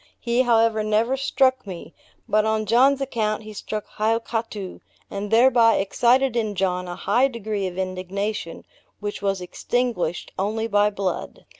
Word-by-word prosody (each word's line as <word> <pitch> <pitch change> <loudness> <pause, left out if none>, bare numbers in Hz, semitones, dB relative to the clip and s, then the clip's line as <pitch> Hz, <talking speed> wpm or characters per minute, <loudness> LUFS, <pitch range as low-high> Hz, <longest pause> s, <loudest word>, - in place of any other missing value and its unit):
He, 235 +1 +1
however, 230 -3 +3
never 220 +4 +1
struck 260 -3 +1
me; 175 -3 -8 0.3
but 215 0 +3
on 220 0 0
John's 260 +6 +4
account 220 -5 -1
he 215 0 -9
struck 210 +1 -5
Hiokatoo, 225 -2 -2 0.3
and 200 +1 -4
thereby 230 0 +5
excited 240 +6 +2
in 215 -3 -1
John 180 -1 -1
a 175 - -5
high 255 +8 +2
degree 215 -5 -3
of 180 0 -7
indignation, 190 0 -4 0.3
which 205 0 -5
was 195 -2 -1
extinguished 180 -2 -2
only 215 +3 -1
by 205 -1 +3
blood. 195 -3 -4
215 Hz, 145 wpm, -23 LUFS, 195-235 Hz, 0.3 s, thereby